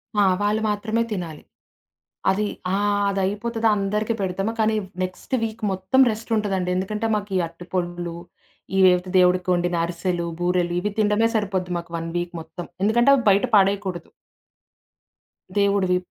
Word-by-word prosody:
ఆ! 205 - +4 0.2
వాళ్ళు 210 +1 +1
మాత్రమే 220 +2 -1
తినాలి. 170 -6 -5 0.9
అది 205 +2 0 0.3
ఆహ్, 205 0 +1
అదయిపోతది 210 +4 -1
అందరికీ 210 +3 -1
పెడతామ. 195 +3 -1
కానీ, 220 0 +2 0.3
నెక్సట్ 185 +7 -4
వీక్ 225 0 -4
మొత్తం 190 +8 +2
రెస్టుంటదండి. 210 -5 -1
ఎందుకంటే 210 +4 -2
మాకీ 205 -2 -3
అర్టి 170 +2 -13
పొండ్లు, 175 -1 -2 0.6
ఈ - - +3
వేవయితే 180 0 +3
దేవుడి 180 0 +5
కొండి‌న 175 -1 +1
అరిసెలు, 175 0 -2 0.2
బూరెలు 175 -1 +1
ఇవి 210 +3 -2
తిండమే 210 +2 +3
సరిపోద్ది 190 -4 -1
మాకు 170 0 -11
వన్ 165 0 -4
వీక్ 175 0 -3
మొత్తం. 170 +2 -9 0.2
ఎందుకంటే 240 +6 +4
అవి 250 - -1
బయట 200 +4 +4
పడేయకూడదు. 195 -2 0 1.5
దేవుడివి 200 -2 +3
195 Hz, 135 wpm, -23 LUFS, 180-210 Hz, 1.5 s, దేవుడి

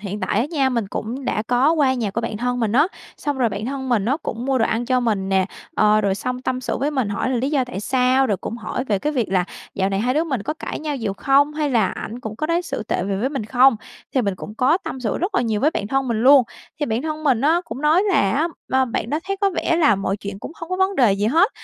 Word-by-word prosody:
Hiện 205 0 -5
tại 205 - 0
á 255 - 0
nha, 275 -5 +2
mình 235 -5 -1
cũng 245 +7 -5
đã 215 - -1
có 250 +7 +3
qua 285 -5 +3
nhà 230 -5 -2
của 215 - -2
bạn 225 -2 -3
thân 245 +2 -1
mình 220 -3 0
á, 295 +7 +5 0.3
xong 290 -2 -2
rồi 245 -3 +3
bạn 205 +1 -4
thân 265 0 -4
mình 230 -5 +2
á, 260 +6 +1
cũng 235 +1 -4
mua 265 -1 +2
đồ 225 - +3
ăn 230 +2 -1
cho 255 -1 +2
mình 210 -5 0
nè, 190 -1 +2 0.3
ờ, 215 0 +4
rồi 200 -2 +1
xong 250 +4 -4
tâm 255 0 -2
sự 250 - -2
với 285 +4 0
mình 260 -7 -1
hỏi 205 +5 -1
là 255 - +1
lý 265 +4 -1
do 275 -4 +2
tại 245 -5 -6
sao, 255 +3 +2
rồi 205 -5 0
cũng 230 - -6
hỏi 250 +2 -4
về 205 -5 0
cái 300 +9 -1
việc 245 -6 0
là 185 -2 +3 0.3
dạo 190 0 +1
này 195 0 -1
hai 250 +4 +1
đứa 315 +2 +2
mình 265 -9 -2
có 305 - -3
cãi - - -5
nhau 300 -2 -3
nhiều 220 -5 -2
không, 280 +6 +3
hay 300 -2 -1
là 225 -6 +3
ảnh 235 +6 -6
cũng 220 -2 -6
có 310 - -2
đối 340 +2 +1
xử 330 - -4
tệ 195 - -2
về 195 0 -1
với 230 +7 0
mình 270 -7 -3
không, 255 +2 +4 0.4
thì 260 - +3
mình 200 -3 -1
cũng 210 +3 -9
có 260 +9 +3
tâm 265 - -6
sự 220 -5 -1
rất 380 +3 -2
là - - +3
nhiều 220 -3 -1
với 300 - +3
bạn 200 - -3
thân 270 +1 0
mình 225 -1 0
luôn. 270 +1 +8 0.4
Thì 295 - +1
bạn 225 +4 -1
thân 310 0 -4
mình 255 -5 +3
á, 320 +4 +3
cũng 265 - -7
nói 315 +5 +4
là 195 - +3 0.4
á 260 0 +3
b 230 - -9
bạn 225 - -2
đó 300 - +1
thấy 390 0 -2
có 395 - +3
vẻ 340 -2 0
là 300 -9 +4
mọi 195 0 -2
chuyện 200 -1 -7
cũng 295 - -8
hông 330 +1 -9
có 370 - 0
vấn 380 +1 +1
đề 235 -7 +5
gì 200 +2 0
hết 330 - +4
250 Hz, 300 wpm, -21 LUFS, 215-285 Hz, 0.4 s, luôn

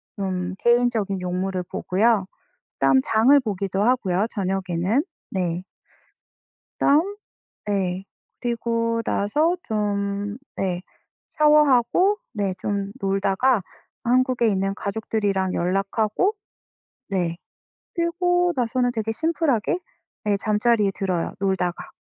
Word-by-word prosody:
좀 185 -2 -3
개인적인 235 -5 +2
용무를 180 +1 -2
보고요. 205 +1 +2 0.5
그다음 135 -1 +4
장을 230 +6 +5
보기도 195 -3 -2
하고요. 215 -5 +2
저녁에는 190 - 0 0.3
네. 180 -2 -1 1.2
그다음 340 +9 +3 0.5
네. 190 -2 -1 0.4
그리고 230 -1 -1
나서 305 - +1
좀 205 0 -2 0.2
네, 180 -2 -1 0.5
샤워하고 300 - +4 0.2
네, 200 -3 -1
좀 200 0 -2
놀다가 195 +4 +2 0.4
한국에 250 -1 +2
있는 195 -1 +1
가족들이랑 200 -2 -1
연락하고 205 - +1 0.8
네, 175 -3 -1 0.6
그리고 355 +1 +1
나서는 245 0 +1
되게 225 -1 -2
심플하게 320 - 0 0.5
네 205 -1 +2
잠자리에 210 0 +2
들어요, 185 -4 -1
놀다가. 190 -3 -1
205 Hz, 230 characters per minute, -23 LUFS, 190-245 Hz, 1.2 s, 장을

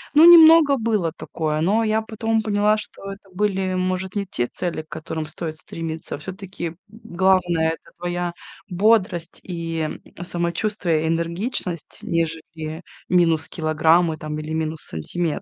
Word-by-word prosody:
Ну, 310 - +9
немного 325 -4 +9
было 215 -8 0
такое, 155 -1 -3
но 205 +7 +2
я 220 0 +1
потом 225 0 -1
поняла, 210 0 +2
что 210 - -6
это 195 0 -16
были, 190 -1 0
может, 185 +1 -2
не 200 -1 -2
те 120 -9 -1
цели, 170 +3 -4
к 155 - -35
которым 160 0 -5
стоит 155 0 -6
стремиться. 160 0 -6
А - - -7
всё-таки, 185 +1 -6
м, 165 - -8
главное 185 -5 +1
это 165 - -10
твоя 175 0 -2 0.4
бодрость 185 -3 +2
и, 165 -2 -4
м, 155 -1 -3 0.2
самочувствие, 170 -1 -1
энергичность, 170 - -2
нежели 160 0 -3 0.3
минус 165 -3 +3
килограммы 160 +1 +2
там 155 -1 -5
или 155 +1 -5
минус 160 0 -2
сантиметр. 155 - -2
175 Hz, 145 wpm, -22 LUFS, 160-200 Hz, 0.4 s, Ну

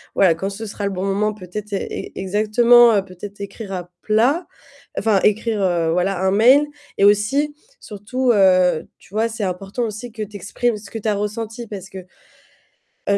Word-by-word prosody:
voilà, 180 -4 +4
quand 195 +4 -3
ce 220 +3 -7
sera 205 0 -6
le 200 - -1
bon 190 0 -3
moment, 210 +2 0
peut-être 205 +2 -8
ex 195 - -4
exactement 215 +3 +4
peut-être 195 +2 -11
écrire 200 +1 -7
à 180 -2 -5
plat, 245 +11 +2 0.5
enfin 205 -3 +2
écrire, 215 0 +1
heu, 170 -3 +1
voilà 180 +1 0
un 190 0 +2
mail 255 +8 +5 0.3
et 200 - +4
aussi 270 +9 +2 0.2
surtout, 240 +5 -2
heu, 185 -4 +4
tu 195 - -22
vois, 225 +2 +1
c'est 220 -2 -5
important 195 +6 -3
aussi 225 +2 -5
que 220 -1 -5
tu 210 0 -10
exprimes 220 +5 -1
ce 205 0 -13
que 225 - -5
tu 220 - -5
as 210 - +2
ressenti 225 +3 -4
parce 195 -2 -8
que, 190 - -10 1.1
heu, 200 - +4
205 Hz, 180 wpm, -20 LUFS, 195-225 Hz, 1.1 s, mail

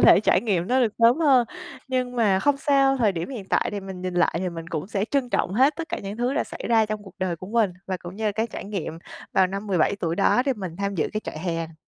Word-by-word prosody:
thể - - +7
trải - - +3
nghiệm 190 -7 0
nó 255 +4 +2
được 230 -4 +2
sớm 235 +2 +6
hơn. 265 -7 +4 0.4
Nhưng 255 -1 -1
mà 205 -5 +3
không 285 -1 +3
sao, 275 -2 +3
thời 220 -6 +2
điểm 165 +5 -4
hiện 240 -7 -6
tại - - +1
thì 205 - -3
mình 190 -2 -8
nhìn 185 -1 -3
lại 175 -1 +2
thì 185 +1 -1
mình 165 -1 -7
cũng 155 -1 -3
sẽ 200 -1 -1
trân 270 -3 0
trọng 185 - 0
hết 270 +6 +4
tất 330 0 -5
cả - - -3
những 200 +1 -6
thứ 245 +3 0
đã - - +1
xảy - - -9
ra 225 -2 +4
trong 215 -1 -4
cuộc 195 - -13
đời 185 -2 -1
của 185 - -9
mình, 220 -2 +2 0.2
và 190 -1 -2
cũng 175 +1 -10
như 220 - -4
là 210 - +1
cái 220 +3 -1
trải - - -7
nghiệm 190 -5 -4 0.3
vào 190 -1 +4
năm 195 +3 -5
17 190 0 +2
tuổi 165 -3 -2
đó 205 +5 +3
để 270 - +3
mình 185 -8 -6
tham 200 +1 -2
dự 165 - 0
cái 215 - -2
trại - - -6
hè. 165 -1 -3
205 Hz, 290 wpm, -24 LUFS, 185-245 Hz, 0.4 s, thể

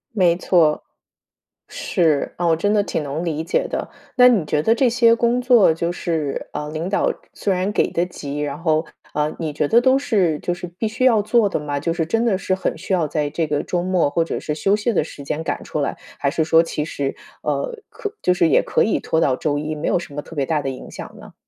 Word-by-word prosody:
没 175 -3 +3
错。 165 -5 +2 0.9
是， 160 -5 0
啊 175 - 0
我 165 - +4
真 205 +6 0
的 205 - +4
挺 160 -6 -2
能 145 +4 -3
理 160 -1 -2
解 170 - 0
的， - - -4 0.3
那 250 -1 +7
你 205 -10 +2
觉 150 0 0
得 225 - +4
这 250 0 +3
些 230 -1 +4
工 235 +1 +1
作 245 -8 +5
就 170 +1 -2
是， 160 -5 -3
呃， 150 0 -4
领 160 +4 -3
导 200 - +1 0.2
虽 195 - -1
然 185 +2 0
给 - - +1
得 170 +1 +1
急， 145 -5 -6
然 145 -1 -3
后， 160 -1 +1 0.3
呃， 150 +1 -1
你 160 -2 -3
觉 145 0 -1
得 235 +7 +5
都 260 +1 +4
是 190 - +1
就 175 - -2
是 175 - -6
必 180 +6 -4
须 230 +4 -3
要 230 -5 +5
做 215 -1 +3
的 - - -1
吗？ 145 -1 -3
就 165 +4 -1
是 165 -2 -1
真 225 +7 0
的 210 -6 +2
是 185 -1 -1
很 190 - -2
需 185 +3 -3
要 170 -4 +2
在 150 0 -1
这 160 +2 -1
个 145 -1 0
周 175 -1 -1
末 180 -5 +2
或 165 +2 +1
者 - - -3
是 150 - -3
休 195 +6 +2
息 220 +2 0
的 - - +2
时 145 -2 -10
间 155 +3 -3
赶 - - -3
出 150 - -3
来， - - -2 0.2
还 140 -1 0
是 160 -1 0
说 165 +1 +5
其 150 -2 -3
实， 140 -3 -3 0.3
呃， 485 -2 -2
可 420 0 -6
就 180 - +3
是 175 -2 +3
也 155 - +4
可 - - +1
以 215 - +1
拖 160 - 0
到 140 -5 +2
周 145 +1 -1
一， 155 +1 -3
没 150 - -2
有 180 - +2
什 160 - -10
么 145 - -4
特 165 - -12
别 135 - +1
大 155 -1 0
的 135 - -3
影 130 - -8
响 - - -9
呢？ - - -13
170 Hz, 270 characters per minute, -21 LUFS, 150-205 Hz, 0.9 s, 那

